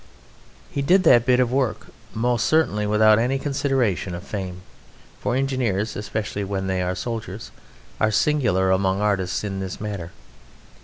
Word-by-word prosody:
He 140 Hz, -, -2 dB
did 185 Hz, +7 st, +4 dB
that 120 Hz, -5 st, +5 dB
bit 125 Hz, -1 st, +4 dB
of 125 Hz, -1 st, +2 dB
work 130 Hz, -3 st, 0 dB, 0.3 s
most 120 Hz, +1 st, +1 dB
certainly 105 Hz, -10 st, +2 dB
without 110 Hz, +1 st, +5 dB
any 125 Hz, +4 st, +1 dB
consideration 135 Hz, -, -1 dB
of 85 Hz, -, -7 dB
fame, 95 Hz, -3 st, -6 dB, 0.6 s
for 120 Hz, -, -1 dB
engineers 125 Hz, -6 st, -1 dB
(especially 105 Hz, 0 st, -3 dB
when 95 Hz, -1 st, -3 dB
they 95 Hz, -1 st, -1 dB
are 90 Hz, 0 st, -1 dB
soldiers) 110 Hz, -3 st, -5 dB, 0.5 s
are 110 Hz, -, +3 dB
singular 105 Hz, -6 st, +2 dB
among 95 Hz, 0 st, +1 dB
artists 100 Hz, -3 st, 0 dB
in 100 Hz, -2 st, -3 dB
this 95 Hz, -1 st, -5 dB
matter. 100 Hz, -5 st, -5 dB
105 Hz, 150 wpm, -23 LUFS, 95-125 Hz, 0.6 s, that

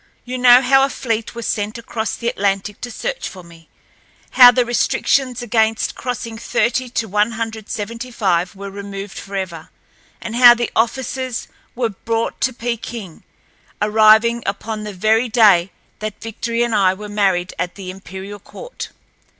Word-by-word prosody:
You 250 Hz, +1 st, -4 dB
know 245 Hz, 0 st, +8 dB
how 270 Hz, +1 st, +5 dB
a 275 Hz, -, +2 dB
fleet 230 Hz, -4 st, -3 dB
was 235 Hz, -2 st, -5 dB
sent 210 Hz, +2 st, -2 dB
across 225 Hz, -1 st, -4 dB
the 235 Hz, -, -5 dB
Atlantic 200 Hz, -2 st, -1 dB
to 245 Hz, -, -5 dB
search -, -, -4 dB
for 185 Hz, -1 st, -11 dB
me, 165 Hz, -1 st, -17 dB, 0.6 s
how 250 Hz, -1 st, +9 dB
the 245 Hz, 0 st, +2 dB
restrictions 250 Hz, +1 st, +1 dB
against 220 Hz, -1 st, +1 dB
crossing 235 Hz, -2 st, -5 dB
thirty 240 Hz, +3 st, 0 dB
to 230 Hz, -2 st, -2 dB
one 210 Hz, +3 st, +1 dB
hundred 225 Hz, -1 st, -5 dB
seventy 230 Hz, +2 st, -5 dB
five 185 Hz, -6 st, 0 dB
were 200 Hz, 0 st, -7 dB
removed 200 Hz, 0 st, -7 dB
forever, 190 Hz, -5 st, -6 dB, 0.5 s
and 230 Hz, 0 st, -6 dB
how 240 Hz, -1 st, +9 dB
the 240 Hz, -1 st, -2 dB
officers 255 Hz, +1 st, -1 dB, 0.3 s
were 240 Hz, -2 st, 0 dB
brought 225 Hz, +3 st, -3 dB
to 260 Hz, -, +2 dB
Peking, 235 Hz, -6 st, -5 dB, 0.6 s
arriving 220 Hz, +2 st, +4 dB
upon 215 Hz, +2 st, -4 dB
the 210 Hz, -, -6 dB
very 220 Hz, +5 st, +2 dB
day 205 Hz, -6 st, +5 dB, 0.3 s
that 215 Hz, -1 st, -5 dB
Victory 230 Hz, +1 st, -2 dB
and 235 Hz, -1 st, -1 dB
I 190 Hz, -3 st, +3 dB
were 210 Hz, +2 st, -8 dB
married 195 Hz, -4 st, 0 dB
at 180 Hz, 0 st, -3 dB
the 190 Hz, -2 st, -7 dB
imperial 190 Hz, +2 st, -9 dB
court. -, -, -9 dB
220 Hz, 160 wpm, -19 LUFS, 200-240 Hz, 0.6 s, how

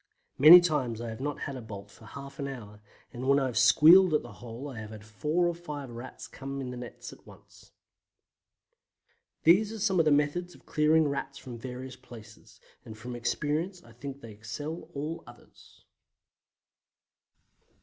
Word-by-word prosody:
Many 165 Hz, +6 st, +11 dB
times 135 Hz, -10 st, -1 dB
I 120 Hz, 0 st, -5 dB
have 110 Hz, +2 st, -7 dB
not 145 Hz, +1 st, -3 dB
had 140 Hz, -, -4 dB
a 130 Hz, -, -7 dB
bolt 100 Hz, -3 st, -10 dB
for 110 Hz, -, -16 dB
half 140 Hz, +4 st, -10 dB
an 140 Hz, -, -3 dB
hour 105 Hz, -6 st, -9 dB, 0.3 s
and 125 Hz, +2 st, -5 dB
when 140 Hz, -, +5 dB
I 135 Hz, -, 0 dB
have 125 Hz, -3 st, -3 dB
squealed 160 Hz, +7 st, +7 dB
at -, -, +1 dB
the -, -, -10 dB
hole 115 Hz, +7 st, -9 dB
I 130 Hz, -6 st, -7 dB
have 110 Hz, -1 st, -8 dB
had 105 Hz, -1 st, -11 dB
four 150 Hz, -, 0 dB
or 175 Hz, -, +1 dB
five 150 Hz, -6 st, -7 dB
Rats 120 Hz, +2 st, -9 dB
in 135 Hz, -1 st, -5 dB
the 125 Hz, -, -7 dB
nets 120 Hz, -1 st, -9 dB
at -, -, -19 dB
once. -, -, -18 dB, 1.7 s
These 200 Hz, +6 st, +5 dB
are 225 Hz, -, -6 dB
some 195 Hz, -3 st, +1 dB
of 165 Hz, -, +4 dB
the 155 Hz, -, +4 dB
methods 150 Hz, +5 st, 0 dB
of -, -, -20 dB
clearing 155 Hz, +1 st, +3 dB
Rats 140 Hz, -1 st, -4 dB
from 125 Hz, -3 st, -9 dB
various 130 Hz, +1 st, -7 dB
places, 115 Hz, -3 st, -15 dB, 0.2 s
and 110 Hz, -1 st, -10 dB
from 120 Hz, +2 st, -7 dB
experience 155 Hz, +9 st, -2 dB
I 115 Hz, -, -17 dB
think 140 Hz, +4 st, -8 dB
they 115 Hz, -, -10 dB
excel 145 Hz, +10 st, -7 dB
all 150 Hz, +4 st, -4 dB
others. 120 Hz, 0 st, -18 dB
140 Hz, 180 wpm, -29 LUFS, 120-155 Hz, 1.7 s, Many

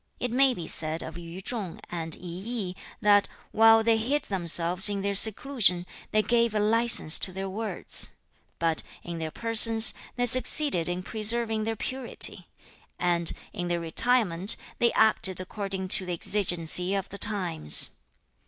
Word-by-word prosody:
4. -, -, -4 dB
'It 245 Hz, -, -3 dB
may 265 Hz, +1 st, +3 dB
be 170 Hz, -, -7 dB
said 160 Hz, 0 st, -4 dB
of 160 Hz, -, -9 dB
Yu 175 Hz, +1 st, -9 dB
chung 210 Hz, -8 st, -5 dB
and 165 Hz, -2 st, -2 dB
I -, -, -16 dB
yi, 190 Hz, +2 st, -4 dB, 0.3 s
that, 205 Hz, -1 st, +4 dB, 0.2 s
while 225 Hz, 0 st, +5 dB
they 225 Hz, 0 st, +2 dB
hid 270 Hz, +6 st, -1 dB
themselves 180 Hz, -, -1 dB
in 200 Hz, -1 st, -4 dB
their 200 Hz, 0 st, -1 dB
seclusion, 210 Hz, -3 st, +2 dB, 0.2 s
they 215 Hz, 0 st, +1 dB
gave 235 Hz, -1 st, +1 dB
a -, -, +1 dB
license 225 Hz, -5 st, +4 dB
to 185 Hz, -, -1 dB
their 190 Hz, +1 st, -5 dB
words; 205 Hz, 0 st, -2 dB, 0.4 s
but, 165 Hz, -1 st, -1 dB, 0.2 s
in 170 Hz, -1 st, -7 dB
their 160 Hz, -1 st, -4 dB
persons, 225 Hz, +3 st, +4 dB, 0.2 s
they 245 Hz, 0 st, -1 dB
succeeded 255 Hz, -, +2 dB
in 180 Hz, +1 st, -4 dB
preserving 220 Hz, +1 st, +1 dB
their 225 Hz, 0 st, -2 dB
purity, 255 Hz, +3 st, -1 dB, 0.5 s
and, 170 Hz, -2 st, -1 dB, 0.2 s
in 175 Hz, -, -5 dB
their 175 Hz, 0 st, -2 dB
retirement, 195 Hz, +1 st, 0 dB, 0.2 s
they 235 Hz, -, +3 dB
acted 190 Hz, -4 st, +3 dB
according 190 Hz, 0 st, -5 dB
to 185 Hz, 0 st, 0 dB
the 180 Hz, -, -3 dB
exigency 180 Hz, 0 st, +1 dB
of 195 Hz, -1 st, -4 dB
the 200 Hz, -, -8 dB
times. 180 Hz, -, +1 dB
200 Hz, 160 wpm, -26 LUFS, 175-225 Hz, 0.5 s, while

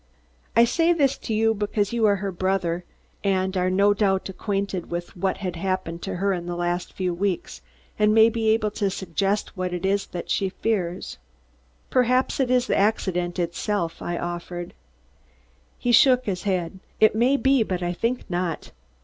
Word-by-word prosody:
I 235 Hz, -, +7 dB
say 330 Hz, +8 st, +3 dB
this 280 Hz, -5 st, +2 dB
to 225 Hz, -, -4 dB
you 225 Hz, +1 st, +3 dB
because 205 Hz, 0 st, -1 dB
you 230 Hz, -2 st, +3 dB
are 205 Hz, -, +4 dB
her 195 Hz, 0 st, -3 dB
brother 180 Hz, -1 st, -1 dB, 0.4 s
and 190 Hz, -1 st, 0 dB
are 185 Hz, 0 st, +1 dB
no 200 Hz, +2 st, +4 dB
doubt 195 Hz, -2 st, +1 dB
acquainted 195 Hz, -2 st, -3 dB
with 175 Hz, 0 st, -5 dB
what 190 Hz, +1 st, -1 dB
has 180 Hz, -, -2 dB
happened 175 Hz, -1 st, -3 dB
to 195 Hz, -1 st, -4 dB
her 195 Hz, +2 st, +1 dB
in 175 Hz, -1 st, -4 dB
the 175 Hz, -, -3 dB
last 175 Hz, 0 st, -2 dB
few 185 Hz, -2 st, -1 dB
weeks, 185 Hz, 0 st, -2 dB, 0.4 s
and 210 Hz, 0 st, +4 dB
may 220 Hz, +1 st, +7 dB
be 225 Hz, -1 st, 0 dB
able 220 Hz, -1 st, +2 dB
to 200 Hz, -1 st, -1 dB
suggest 195 Hz, +3 st, -2 dB
what 185 Hz, -1 st, -3 dB
it 180 Hz, -, -4 dB
is 195 Hz, +1 st, +1 dB, 0.2 s
she 195 Hz, -, 0 dB
fears." 185 Hz, -3 st, -2 dB, 0.7 s
"Perhaps 255 Hz, +1 st, +2 dB
it 260 Hz, -2 st, +1 dB
is 250 Hz, -1 st, +3 dB
the -, -, 0 dB
accident 185 Hz, -4 st, 0 dB
itself," 175 Hz, 0 st, -2 dB
I 175 Hz, -, -3 dB
offered. 175 Hz, 0 st, -5 dB, 1.0 s
He 245 Hz, -, 0 dB
shook 255 Hz, +1 st, +5 dB
his 185 Hz, -3 st, -2 dB
head. 185 Hz, -2 st, -1 dB, 0.2 s
"It 215 Hz, -, +6 dB
may 245 Hz, +5 st, +3 dB
be, 270 Hz, -2 st, +3 dB
but 185 Hz, -4 st, -1 dB
I 175 Hz, 0 st, -1 dB
think 235 Hz, +7 st, -2 dB
not. 175 Hz, -2 st, -3 dB
195 Hz, 175 wpm, -24 LUFS, 180-220 Hz, 1.0 s, I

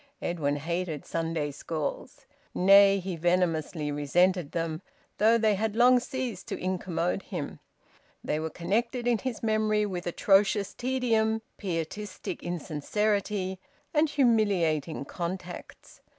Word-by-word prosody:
Edwin 150 Hz, -5 st, -1 dB
hated 165 Hz, +1 st, -3 dB
Sunday 165 Hz, -3 st, -2 dB
schools. 150 Hz, +1 st, -5 dB, 0.3 s
Nay, 195 Hz, +1 st, +7 dB
he 185 Hz, -1 st, -4 dB
venomously 165 Hz, -3 st, 0 dB
resented 170 Hz, +3 st, +2 dB
them, 165 Hz, -1 st, -2 dB, 0.4 s
though 225 Hz, +3 st, +5 dB
they 220 Hz, -2 st, +3 dB
had 215 Hz, +2 st, -1 dB
long 250 Hz, +2 st, +6 dB
ceased 250 Hz, -6 st, -5 dB
to -, -, -3 dB
incommode 180 Hz, 0 st, -1 dB
him. 175 Hz, -9 st, -6 dB, 0.6 s
They 150 Hz, -, -1 dB
were 160 Hz, 0 st, -3 dB
connected 230 Hz, -, -1 dB
in 240 Hz, -2 st, +2 dB
his 250 Hz, -2 st, -4 dB
memory 215 Hz, -1 st, +2 dB
with 180 Hz, -3 st, -4 dB
atrocious 195 Hz, +3 st, +3 dB
tedium, 225 Hz, -4 st, 0 dB
pietistic 185 Hz, +2 st, -4 dB
insincerity, 190 Hz, +4 st, -1 dB, 0.3 s
and 305 Hz, 0 st, +3 dB
humiliating 195 Hz, -, +1 dB
contacts. 175 Hz, +3 st, -7 dB
185 Hz, 115 wpm, -28 LUFS, 165-215 Hz, 0.6 s, Nay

